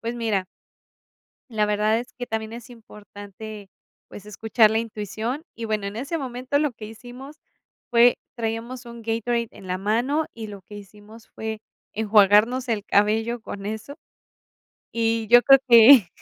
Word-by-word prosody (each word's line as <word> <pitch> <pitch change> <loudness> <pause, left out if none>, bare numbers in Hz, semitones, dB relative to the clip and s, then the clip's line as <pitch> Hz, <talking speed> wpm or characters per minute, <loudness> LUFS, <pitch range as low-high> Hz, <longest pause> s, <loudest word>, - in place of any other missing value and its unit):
Pues 230 +1 -4
mira 220 -5 -1 1.1
la 215 -2 +1
verdad 210 +2 +1
es 245 - -10
que 245 - -5
también 220 -1 -4
es 235 +2 -10
importante, 210 -2 -11 0.4
pues 205 - -12
escuchar 220 +1 +2
la 220 - +1
intuición. 225 +5 -5
Y 230 - -6
bueno, 215 -2 -2
en 200 - -7
ese 280 +8 -3
momento 255 -1 -3
lo 295 -3 0
que 220 -2 -10
hicimos 245 +6 -11 0.5
fue, 240 0 +5 0.2
traíamos 235 +2 -5
un 235 0 -10
Gatorade 230 +1 -2
en 190 - -13
la 185 0 -2
mano 240 +10 0
y 225 -1 -8
lo 200 -2 -10
que 205 - -13
hicimos 210 +2 -14
fue 220 -1 -6 0.3
enjuagarnos 215 +4 +3
el 215 -3 -1
cabello 220 +3 +1
con 200 -3 -8
eso. 220 +7 -6 1.0
Y 225 -1 0
yo 240 +2 +7
creo 270 +1 +7
que 235 -3 +8
225 Hz, 155 wpm, -23 LUFS, 210-240 Hz, 1.1 s, que